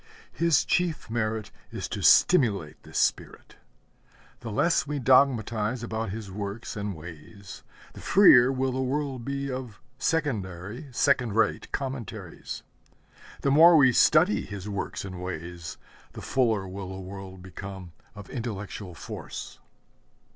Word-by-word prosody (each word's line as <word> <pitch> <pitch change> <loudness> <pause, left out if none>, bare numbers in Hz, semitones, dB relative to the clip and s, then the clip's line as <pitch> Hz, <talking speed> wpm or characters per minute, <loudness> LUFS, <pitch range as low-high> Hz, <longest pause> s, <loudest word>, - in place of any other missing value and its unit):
His 165 -5 +2
chief 170 -10 0
merit 110 -2 -2 0.2
is - - -4
to - - -4
stimulate 100 - +4
this - - -8
spirit. - - -1 0.8
The 115 - -7
less 160 +10 +2
we 145 0 -2
dogmatize 120 -3 +2
about 110 -2 -3
his 105 -1 -6
works 100 +3 -5
and 100 -2 -4
ways, 85 +5 -11 0.3
the - - -11
freer 135 -11 +7
will 130 0 0
the 130 +1 -2
world 135 -1 -2
be 140 +1 -3
of 125 -5 -6 0.2
secondary, 115 - -2
second 125 -4 +2
rate 110 - +1
commentaries. 135 -5 -5 0.8
The 140 - +1
more 165 +4 +8
we 130 -4 +6
study 160 - +4
his 100 -1 -7
works 100 -1 -4
and 95 -2 -7
ways, 85 -2 -6 0.4
the - - -8
fuller 110 -7 +1
will 95 0 -7
the 95 0 -7
world 95 -1 -9
become 95 0 -8 0.2
of 105 -2 -10
intellectual 105 -6 -6
force. - - -8
110 Hz, 135 wpm, -27 LUFS, 95-135 Hz, 0.8 s, more